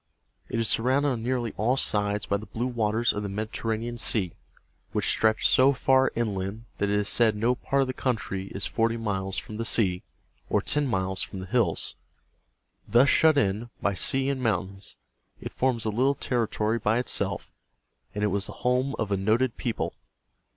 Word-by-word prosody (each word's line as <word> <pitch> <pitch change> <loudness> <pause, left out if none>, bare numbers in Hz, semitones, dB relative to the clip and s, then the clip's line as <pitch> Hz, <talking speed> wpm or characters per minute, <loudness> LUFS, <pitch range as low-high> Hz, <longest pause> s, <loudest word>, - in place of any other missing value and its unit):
It 115 - -2
is 115 - +1
surrounded 130 +7 +3
on 120 -4 -2
nearly 120 -1 -1
all 120 +5 +1
sides 105 -3 0
by 100 - 0
the 110 - -10
blue 120 +2 -3
waters 115 -1 +1
of 105 - -3
the 100 - -4
Med 105 +2 -3
it - - -6
er - - -3
ra´ne 110 +1 -1
an 120 0 -5
Sea, 95 -7 +1 0.6
which - - 0
stretch 110 0 +3
so 135 +2 +5
far 130 0 +3
inland 105 -1 -3
that 100 - +1
it 100 - +1
is 105 0 +1
said 110 -2 +3
no 115 +4 +2
part 135 +2 0
of - - -3
the 130 - -3
country 105 -7 -2
is 100 0 -3
forty 115 0 0
miles 95 -4 -2
from 105 - -5
the 115 - -2
sea, 95 -6 +1 0.5
or - - +3
ten 150 -1 0
miles 95 -4 0
from - - -5
the 95 - -6
hills. 95 -5 0 0.9
Thus 120 +6 +5
shut 160 -2 +5
in 110 -1 0
by 100 - 0
sea 135 +8 +2
and 135 -2 -3
mountains, 95 -4 -2 0.4
it - - -7
forms 125 -4 0
a 110 - 0
little 130 +6 +2
territory 115 -3 -1
by 105 +1 +1
itself, 125 - -2 0.6
and 105 - -2
it - - +3
was 100 -1 0
the - - -7
home 125 +3 +1
of 105 -2 -2
a 100 - +2
noted 110 +5 +1
people. 115 - -3
115 Hz, 200 wpm, -26 LUFS, 100-125 Hz, 0.9 s, so